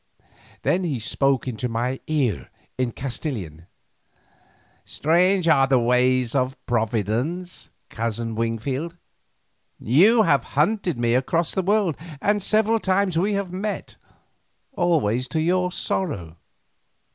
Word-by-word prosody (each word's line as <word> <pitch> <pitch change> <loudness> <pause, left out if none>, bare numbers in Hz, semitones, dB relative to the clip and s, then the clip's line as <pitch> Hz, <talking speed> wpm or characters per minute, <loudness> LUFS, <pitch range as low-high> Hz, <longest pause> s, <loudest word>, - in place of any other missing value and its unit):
Then 185 +2 +1
he 150 -8 -2
spoke 135 +4 0
into 125 0 -3
my 120 +3 -2
ear 135 - -1 0.3
in 130 -2 -1
Castilian: 115 - -5 1.2
"Strange 180 +3 +2
are 135 -4 +5
the 135 -1 +4
ways 125 0 +2
of 130 -1 0
Providence, 120 - -2 0.2
Cousin 115 0 -3
Wingfield. 130 +9 -3 0.8
You 200 - +5
have 140 - +3
hunted 180 - +1
me 120 0 +1
across 155 +6 +1
the 190 - 0
world, 195 -4 +1 0.2
and 205 +5 +1
several 220 +3 +2
times 190 -2 +1
we 205 +4 +1
have 200 -3 -3
met, 205 +3 -4 0.7
always 150 - +1
to 160 - -2
your 180 +3 +1
sorrow. 100 - -2
140 Hz, 115 wpm, -23 LUFS, 120-180 Hz, 1.2 s, are